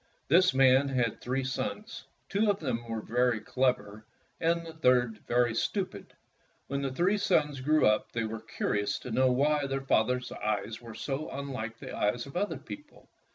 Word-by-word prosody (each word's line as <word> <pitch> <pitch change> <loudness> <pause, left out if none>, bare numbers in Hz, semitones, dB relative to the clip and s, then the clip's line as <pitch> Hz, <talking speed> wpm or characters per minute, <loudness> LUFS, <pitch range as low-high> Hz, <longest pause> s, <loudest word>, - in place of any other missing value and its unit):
This 180 +5 +6
man 135 +1 +5
had 125 -4 0
three 130 +2 -1
sons, 215 - -4 0.2
two 210 +1 +1
of 200 - +1
them 125 -6 -2 0.2
very 125 -1 +2
clever 110 -3 -1 0.4
and 170 +1 +1
the 165 - -8
third 125 -7 +2
very 120 -1 +2
stupid. 145 - -3 0.5
When 140 +1 -3
these 185 +9 +1
sons 150 -7 +1
grew 155 +3 +3
up, 105 0 +2
they 115 - -1
were 110 0 -4
curious 105 -2 -1
to 125 - -8
know 130 +2 +3
why 145 +2 +2
their 135 0 -3
father's 125 +1 +1
eyes 105 +2 -3
were 115 -2 -10
so 140 +2 -3
unlike 130 -5 -5
the - - -8
eyes 110 +4 0
of 140 - -12
other 200 +3 -1
people. 295 0 -11
130 Hz, 165 wpm, -30 LUFS, 115-150 Hz, 0.5 s, This